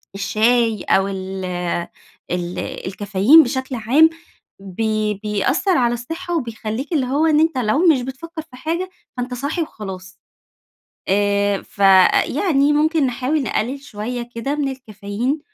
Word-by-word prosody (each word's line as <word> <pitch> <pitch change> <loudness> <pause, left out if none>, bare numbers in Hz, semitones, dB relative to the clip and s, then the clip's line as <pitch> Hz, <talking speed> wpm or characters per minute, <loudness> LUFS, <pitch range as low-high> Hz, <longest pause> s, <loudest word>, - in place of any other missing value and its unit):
الشاي 220 +1 +1
أو 195 0 +2
ال 190 -1 -5 0.9
ال 175 0 -3
الكافيين 205 +10 +3
بشكل 260 0 -3
عام، 260 +8 +4 0.5
بي 215 +2 -1
بيأثَّر 265 - +1
على 240 -2 +2
الصحَّة 330 +9 -4
وبيخليك 230 +2 -4
اللي 285 -5 +1
هو 280 +5 +1
إن 310 -2 +4
أنت 320 -2 +2
لو 255 +9 +2
مش 295 -6 +4
بتفكَّر 290 +6 -7
في 310 -5 -16
حاجة، 335 +7 -3 0.3
فأنت 250 0 -3
صاحي 285 +7 -2
وخلاص 190 - -7 0.9
آآ، 200 0 +1
فيعني 270 - +3
ممكن 310 0 +2
نحاول 260 +4 -1
نقلِّل 260 +2 -2
شوية 240 -1 -5
كده 230 +5 -2
من 295 -2 -1
الكافيين 245 +2 -4
245 Hz, 125 wpm, -20 LUFS, 205-295 Hz, 0.9 s, عام